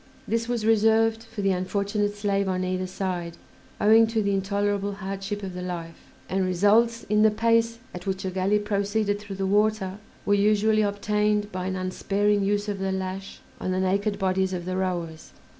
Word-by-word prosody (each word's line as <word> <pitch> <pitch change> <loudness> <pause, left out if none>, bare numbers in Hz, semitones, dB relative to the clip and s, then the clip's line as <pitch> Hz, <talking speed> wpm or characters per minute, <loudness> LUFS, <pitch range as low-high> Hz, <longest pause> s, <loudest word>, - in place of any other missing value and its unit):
This 230 +1 0
was 235 -3 -1
reserved 225 +1 +3
for 215 -2 -6
the 195 - +3
unfortunate 200 +3 -1
slave 200 -1 0
on 185 0 -1
either 185 0 -2
side 180 -3 -4 0.4
owing 225 +2 +6
to 220 -1 0
the 200 0 +1
intolerable 200 +1 0
hardship 195 +1 -5
of 190 -2 -5
the 180 - -5
life, 170 -2 -7 0.2
and 190 0 0
results, 210 +6 +3
in 210 +1 +2
the 220 - +6
pace 230 +1 +2 0.2
at 180 +1 -8
which 190 0 -2
a 185 - -2
galley 190 +3 +1
proceeded 205 0 0
through 200 -1 -8
the 195 0 -2
water, 205 -1 +1 0.3
were 205 - +3
usually 215 +1 +3
obtained 210 0 0
by 185 0 -3
an 190 - -2
unsparing 200 +2 0
use 205 +1 0
of 205 -2 -3
the 195 0 -1
lash 190 0 -5 0.2
on - - -3
the 185 0 0
naked 200 +2 0
bodies 190 -1 0
of 175 -1 -4
the 185 0 -2
rowers. 175 -4 -3
200 Hz, 185 wpm, -25 LUFS, 185-210 Hz, 0.4 s, owing